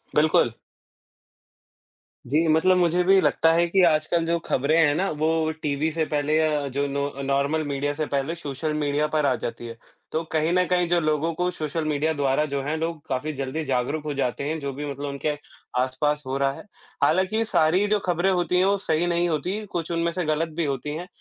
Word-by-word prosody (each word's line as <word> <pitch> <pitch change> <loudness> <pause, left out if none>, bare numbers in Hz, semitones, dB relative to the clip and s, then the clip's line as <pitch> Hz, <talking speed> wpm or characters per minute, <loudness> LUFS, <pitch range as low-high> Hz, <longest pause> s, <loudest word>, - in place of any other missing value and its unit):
बिल्कुल। 150 -5 +4 1.7
जी, 155 +6 +1
मतलब 160 +4 +4
मुझे 180 0 +2
भी 195 +1 +5
लगता 165 - +3
है 170 +1 +3
कि 190 +2 +3
आजकल 165 +1 +2
जो 170 +1 +1
खबरें 140 +5 +1
हैं 155 -3 +4
ना, 190 +5 0
वो 160 +1 0
टीवी 150 +2 0
से 160 0 -1
पहले 150 0 0
अ, 150 -2 +1
जो 140 +2 -1
नो 140 0 -1
अ, 140 0 -8
नॉर्मल 140 +3 0
मीडिया 145 0 -1
से 155 +1 -2
पहले 140 +4 -2
सोशल 150 -1 -4
मीडिया 150 0 0
पर 150 -1 0
आ - - +3
जाती 120 0 -6
है। 115 0 -9 0.3
तो 160 +1 -1
कहीं 160 +1 +1
न 180 0 +3
कहीं 180 -1 +1
जो 175 0 +3
लोगों 155 +1 0
को 180 +2 -1
सोशल 155 -1 -3
मीडिया 155 +1 0
द्वारा 140 0 +1
जो 140 - 0
है 150 +3 -2
लोग 160 -1 -4
काफ़ी 145 +3 -2
जल्दी 135 +3 -3
जागरूक 135 +3 -1
हो 150 - -2
जाते 135 -1 -2
हैं, 155 +3 -2
जो 140 -2 -4
भी 145 +2 -5
मतलब 140 +1 -5
उनके 145 +2 -2 0.5
आस-पास 145 +3 -1
हो 135 +1 -1
रहा 140 0 +1
है। - - -11 0.4
हालाँकि 185 +6 +2
ये 225 - +1
सारी 180 0 +3
जो 210 0 +2
खबरें 175 +1 +1
होती 180 0 +1
हैं 185 - +4
वो 200 +1 +3
सही 170 -3 0
नहीं 175 0 +1
होती, 180 +7 -2
कुछ 170 -4 -4
उनमें 170 0 0
से 180 +1 -2
गलत 155 +2 0
भी 170 - +1
होती 145 +1 -3
हैं, 175 +3 -6
155 Hz, 215 wpm, -24 LUFS, 145-170 Hz, 1.7 s, भी